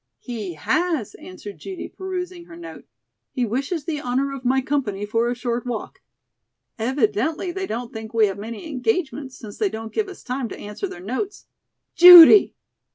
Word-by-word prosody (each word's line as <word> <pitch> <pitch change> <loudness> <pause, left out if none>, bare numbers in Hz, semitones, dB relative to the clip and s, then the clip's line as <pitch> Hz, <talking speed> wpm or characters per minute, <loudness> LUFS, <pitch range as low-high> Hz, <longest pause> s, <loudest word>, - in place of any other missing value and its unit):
"He 210 - -6
has," 310 - -1
answered 195 +2 -11
Judy, 380 -2 -7
perusing 365 -2 -6
her 335 - -13
note. 340 0 -11 0.5
"He 250 -3 0
wishes 275 - -3
the 310 -3 -3
honor 265 +2 -1
of 270 -2 -8
my 260 +1 +2
company 250 -8 -2
for 230 +3 0
a 245 - -2
short 240 -1 -3
walk. 245 -3 -6 0.8
Evidently 260 - -1
they 380 +1 -4
don't 235 +1 -5
think 220 0 -8
we 225 -2 +3
have 195 -1 -4
many 225 +6 -7
engagements 285 - -3
since 210 -3 -11
they 420 - +1
don't 225 -7 -7
give 425 -2 -1
us 380 - -12
time 255 -1 -4
to - - -8
answer 210 - -6
their 175 - -10
notes." 260 - -5 0.5
"Judy!" 355 +3 +10
255 Hz, 170 wpm, -22 LUFS, 220-340 Hz, 0.8 s, Judy